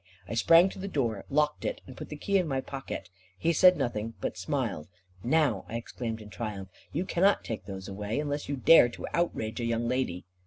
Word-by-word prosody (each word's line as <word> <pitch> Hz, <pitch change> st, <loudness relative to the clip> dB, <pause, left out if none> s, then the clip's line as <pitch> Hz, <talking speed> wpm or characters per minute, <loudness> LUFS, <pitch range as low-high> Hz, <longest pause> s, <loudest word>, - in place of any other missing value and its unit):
I 100 Hz, -, -5 dB
sprang 165 Hz, +10 st, +6 dB
to -, -, -10 dB
the 195 Hz, -, -4 dB
door, 120 Hz, -, -1 dB
locked 150 Hz, +1 st, +1 dB
it, -, -, -2 dB
and 130 Hz, -, -11 dB
put -, -, -8 dB
the 150 Hz, -, -5 dB
key 195 Hz, +6 st, +1 dB
in 180 Hz, -, -1 dB
my 135 Hz, -2 st, 0 dB
pocket. 130 Hz, -9 st, -6 dB, 0.3 s
He 170 Hz, -, +1 dB
said 180 Hz, +3 st, +6 dB
nothing, 115 Hz, -4 st, -2 dB
but -, -, -3 dB
smiled. 95 Hz, -, -2 dB, 0.4 s
"Now," 130 Hz, -, +2 dB
I 115 Hz, -, -5 dB
exclaimed 115 Hz, -1 st, -5 dB
in 105 Hz, -, -13 dB
triumph, 100 Hz, -1 st, -5 dB, 0.2 s
"you 180 Hz, -, -1 dB
cannot 190 Hz, +3 st, +3 dB
take 115 Hz, -, -5 dB
those 95 Hz, -2 st, -7 dB
away, 105 Hz, +5 st, -3 dB
unless 145 Hz, -1 st, -3 dB
you 140 Hz, -, 0 dB
dare 130 Hz, -1 st, +7 dB
to 120 Hz, -, -7 dB
outrage 130 Hz, -10 st, -1 dB
a 120 Hz, -, -1 dB
young 115 Hz, 0 st, 0 dB
lady." 125 Hz, -8 st, -1 dB
125 Hz, 210 wpm, -29 LUFS, 110-150 Hz, 0.4 s, dare